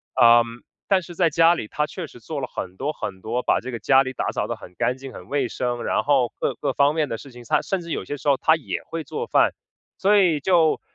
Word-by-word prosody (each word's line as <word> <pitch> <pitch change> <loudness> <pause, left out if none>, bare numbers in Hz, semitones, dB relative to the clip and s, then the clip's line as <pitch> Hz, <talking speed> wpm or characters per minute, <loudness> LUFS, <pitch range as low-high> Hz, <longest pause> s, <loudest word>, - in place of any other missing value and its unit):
呃， 120 -1 +7 0.4
但 195 -2 +3
是 175 0 -11
在 170 -2 +2
家 165 +2 +5
里， 110 - -5
她 150 +7 -1
确 180 +1 -6
实 130 - -14
做 145 +5 -5
了 130 - -2
很 95 0 -5
多， 145 +3 -2
很 95 -9 -6
多， 115 +6 -2
把 - - +2
这 130 - -6
个 120 - -5
家 135 +2 +4
里 130 -1 -5
打 - - -2
扫 - - -2
得 - - -3
很 90 - -14
干 125 - +1
净、 135 0 -9
很 90 -6 -11
卫 140 0 0
生， 120 0 -3
然 - - 0
后 135 -5 +2
各 - - 0
各 - - -2
方 145 +1 +3
面 155 -3 0
的 115 - -3
事 135 +4 -12
情， 120 0 -12
她， - - +2
甚 195 -2 -2
至 170 - -10
有 - - -3
些 145 - -4
时 145 +1 -2
候 140 - +4
她 160 - +4
也 - - -5
会 165 -1 -5
做 455 - -4
饭。 - - +3 0.4
所 205 +2 +4
以 175 -6 +3
就， 165 0 +3
140 Hz, 290 characters per minute, -23 LUFS, 125-165 Hz, 0.4 s, 呃